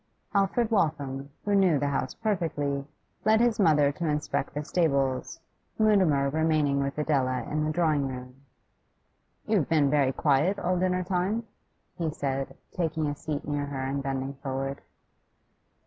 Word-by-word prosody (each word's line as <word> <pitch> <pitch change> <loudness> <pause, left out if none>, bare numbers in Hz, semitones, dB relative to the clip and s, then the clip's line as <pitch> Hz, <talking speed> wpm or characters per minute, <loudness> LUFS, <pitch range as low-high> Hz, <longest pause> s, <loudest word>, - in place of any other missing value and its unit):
Alfred 210 +3 +2
Waltham, 145 -8 0 0.2
who 205 - +1
knew 190 -6 +4
the 145 +1 0
house 135 -2 -2
perfectly, 150 -10 -1 0.4
led 220 +1 +4
his 235 -2 +2
mother 150 -6 +4
to 165 +3 -3
inspect 150 -2 -1
the 150 - -2
stables, 140 -7 0 0.4
Mutimer 185 -11 +4
remaining 155 -2 +2
with 140 +1 -2
Adela 135 -4 +1
in 150 0 -2
the 155 - 0
drawing 155 -4 +1
room. 125 0 -8 1.0
'You've 205 -9 +1
been 150 -4 +3
very 140 -3 +3
quiet 150 +8 +2
all 180 -1 0
dinner 185 0 +1
time,' 190 +5 0 0.6
he 165 -2 0
said, 135 -3 -3
taking 160 -3 -1
a 145 0 -1
seat 145 0 -5
near 145 -1 -1
her 135 -2 -4
and 135 +1 -2
bending 135 0 -3
forward. 135 0 -3
150 Hz, 145 wpm, -27 LUFS, 140-175 Hz, 1.0 s, knew